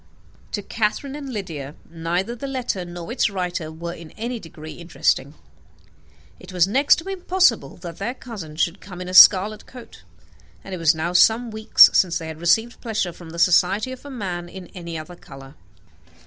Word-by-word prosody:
To 205 - -3
Catherine 230 +7 -2
and 280 -3 -7
Lydia 160 - -6
neither 170 +7 -3
the 275 +4 -6
letter 250 -9 -3
nor 175 +3 -8
its 240 - +1
writer 180 -4 -4
were 170 +2 -6
in 165 -2 -11
any 235 +2 -4
degree 160 -4 -11
interesting. 155 -4 -1 1.0
It 185 - -12
was 180 -1 +3
next 270 +8 +4
to 335 - -8
impossible 375 -1 +1
that 170 -2 -9
their 230 +6 -3
cousin 200 -13 -9
should 170 +3 -1
come 180 -3 -10
in 180 - -6
a 185 - -6
scarlet 205 +3 +7
coat, 250 -1 -13 0.6
and 195 - -8
it 185 - -4
was 165 0 +3
now 170 +3 -2
some 225 +5 +4
weeks 220 0 +7
since 180 -3 +3
they 165 - -7
had 160 0 -8
received 225 +7 +1
pleasure 215 -6 -2
from 170 -1 -12
the 165 - -9
society 185 +7 +3
of 260 - -9
a 285 - -10
man 180 -9 -5
in 180 -1 -11
any 170 -3 -7
other 155 +3 -9
colour. 135 -4 -13
185 Hz, 185 wpm, -22 LUFS, 170-230 Hz, 1.0 s, scarlet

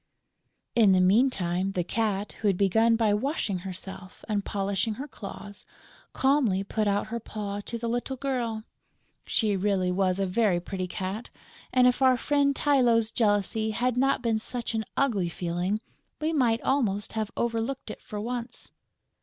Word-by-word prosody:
In 215 -5 +5
the 185 - +4
meantime, 190 -2 +2
the 180 - 0
Cat, 210 +1 -1
who 215 - +1
had 195 -3 +2
begun 225 +4 +4
by 220 -2 +2
washing 210 - -1
herself 190 0 -7
and 205 -2 0
polishing 200 +2 -1
her 275 +6 -6
claws, 205 -4 -9 0.5
calmly 265 -9 +2
put 215 +1 -1
out 205 +1 0
her 235 +1 -3
paw 205 -2 -5
to 235 - -4
the 235 0 -4
little 245 +3 -2
girl. 245 -5 -2 0.6
She 215 -3 +2
really 190 -2 +1
was 185 0 +1
a 195 - +1
very 190 -1 +2
pretty 185 +1 -4
cat; 190 +5 -4 0.4
and, 255 -1 +5
if 250 +1 +3
our 260 -1 +5
friend 280 +1 +2
Tylô's 240 -7 +3
jealousy 215 0 +1
had 240 +3 0
not 270 0 +2
been 225 -2 +1
such 235 +1 -3
an 220 -1 -1
ugly 210 -11 +1
feeling, 175 +5 -2 0.4
we 315 +1 0
might 240 -6 +2
almost 215 -7 0
have 220 -2 -2
overlooked 235 +1 -2
it - - -10
for 210 - -6
once! 240 +2 -5
220 Hz, 160 wpm, -27 LUFS, 195-240 Hz, 0.6 s, In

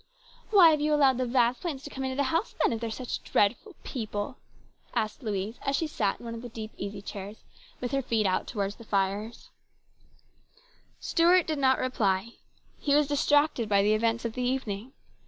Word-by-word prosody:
" - - -25
Why 365 -6 +8
have 305 -1 +1
you 300 0 +2
allowed 270 -4 +4
the 255 - 0
Vasplaines 255 +4 0
to - - -8
come 265 - -5
into 260 0 -2
the 280 - +1
house 335 +7 0
then, - - +3
if 225 - -4
they 230 - -2
are - - -4
such 245 +2 -4
dreadful 250 - 0
people? 220 -1 -4 0.3
" - - -27
asked 215 +5 -1
Louise, 210 -1 -3
as 275 - 0
she 325 - 0
sat 215 -10 -1
in - - -11
one 230 - -5
of 230 - -7
the 245 - -8
deep 220 -1 -7
easy 200 0 -6
chairs, 200 +1 -8 0.4
with 245 0 -3
her 275 -1 +1
feet 230 -4 0
out 185 -1 0
towards 200 -3 -3
the 230 - -11
fire. 200 +1 0 1.7
Stuart 350 +1 +4
did 310 -2 -2
not 265 -1 +4
reply. 220 -3 0 0.5
He 285 -1 +2
was 295 0 +4
distracted 290 -4 +2
by 200 -1 +4
the 210 +1 +3
events 230 +2 0
of 230 - -2
the 250 - -4
evening. 245 -2 -2
240 Hz, 205 wpm, -28 LUFS, 210-275 Hz, 1.7 s, Why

